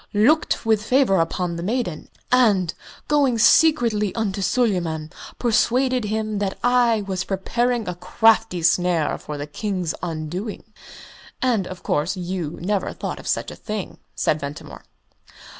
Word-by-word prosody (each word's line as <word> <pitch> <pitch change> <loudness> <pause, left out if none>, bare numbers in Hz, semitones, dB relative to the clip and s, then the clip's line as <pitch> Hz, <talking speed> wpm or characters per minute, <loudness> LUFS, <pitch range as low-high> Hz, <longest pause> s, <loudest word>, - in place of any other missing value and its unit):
looked 245 +6 +3
with 220 -2 +2
favour 250 -4 +3
upon 170 +1 -1
the - - -4
maiden, 205 -4 -3 0.2
and, 210 -9 +3 0.3
going 280 -5 +2
secretly 230 - +4
unto 205 -3 -2
Suleyman, 175 -9 0 0.3
persuaded 250 +1 +2
him 215 0 -2
that 195 -2 -2
I 245 -3 +3
was 190 -2 -3
preparing 235 +4 -1
a 180 - -2
crafty 220 -1 +2
snare 165 -1 +2
for 150 - -7
the 145 - -4
King's 180 +1 -3
undoing." 175 +5 -5 0.8
"And, 230 -8 +1
of 185 -1 -9
course, 155 +6 0
you 175 -3 -4
never 200 +1 -1
thought - - -5
of - - -10
such - - -1
a - - -9
thing?" 210 -3 -6 0.2
said 155 - +1
Ventimore. 140 - -8
205 Hz, 140 wpm, -22 LUFS, 175-230 Hz, 0.8 s, secretly